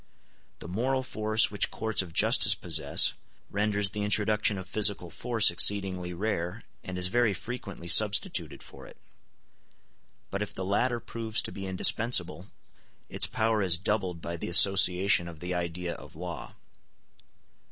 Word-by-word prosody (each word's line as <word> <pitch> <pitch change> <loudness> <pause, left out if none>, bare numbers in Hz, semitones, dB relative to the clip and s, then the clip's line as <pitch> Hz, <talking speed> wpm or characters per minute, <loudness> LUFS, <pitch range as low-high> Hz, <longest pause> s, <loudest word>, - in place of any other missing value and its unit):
The - - -9
moral 130 +8 -2
force 110 -3 0
which 100 - 0
courts 110 -2 -2
of 90 -3 -10
justice - - +3
possess - - +2 0.4
renders 105 -1 -1
the 105 - -5
introduction 105 0 0
of 95 -1 -9
physical 100 -3 +1
force 115 -6 +3
exceedingly 95 -1 +1
rare, 90 -2 -4 0.2
and 95 -1 -7
is 90 - +3
very 110 +1 +1
frequently 100 -6 -8
substituted 105 +3 +2
for - - -14
it; - - -16 1.3
but 100 - -4
if 105 - -6
the 95 - -5
latter 120 +5 -1
proves 115 -1 -4
to - - -5
be 95 -1 -8
indispensable, 95 -1 +2 0.6
its - - +2
power 110 -1 -1
is 90 -3 +2
doubled 90 -2 -3
by 85 0 -5
the - - -6
association 95 0 +4
of 85 -3 -11
the 90 +2 -5
idea 85 0 -4
of - - -14
law. 85 -5 -8
100 Hz, 145 wpm, -27 LUFS, 90-110 Hz, 1.3 s, association